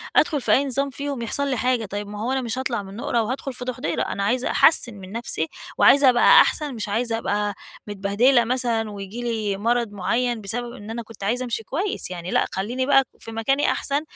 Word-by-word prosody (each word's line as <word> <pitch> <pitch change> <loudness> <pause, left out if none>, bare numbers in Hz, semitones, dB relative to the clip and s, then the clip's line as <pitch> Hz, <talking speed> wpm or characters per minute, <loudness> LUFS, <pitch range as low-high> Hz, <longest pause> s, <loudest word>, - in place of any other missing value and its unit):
أدخل 295 -4 +3
في - - 0
أي 280 - +4
نظام 275 +1 -1
فيهم 280 -2 -5
يحصل 280 +5 -2
لي 260 -3 -1
حاجة، 250 -2 +1
طيب 205 +1 -5
ما 205 0 -7
هو 245 - -1
أنا 265 0 0
مش 235 +1 -4
هاطلع 255 -6 -2
من 195 0 -10
نُقرة 235 +1 0
وادخل 260 +4 -4
في 250 0 -8
دُحْضِيرة 235 -10 -2
أنا 200 - -2
عايزة 245 +5 0
أحسّن 245 -7 +4
من 195 -2 -11
نفسي 225 -8 -2 0.3
وعايزة 280 -1 +6
أبقى 240 -1 +7
أحسن 295 -3 0
مش 215 -2 -4
عايزة 225 +2 0
أبقى 205 -2 -1 0.3
متبهدلة 205 +5 +3
مثلًا 230 -3 -1
وييجي 200 +3 -7
لي 220 -4 -2
مَرَض 235 +1 0
معين 235 +4 -1
بسبب 240 +4 -4
إن 205 -1 -10
أنا 230 +1 -4
كنت 225 -2 -12
عايزه 240 +5 0
أمشي 230 -2 -3
كويس، 375 - -3
يعني 175 0 -5
لأ - - +2
خلّيني 240 +7 -2
بقى 270 -1 +5 0.2
في 225 - -9
مكاني 250 +6 +1
أحسن، 280 +1 -1
235 Hz, 210 wpm, -23 LUFS, 205-255 Hz, 0.3 s, أبقى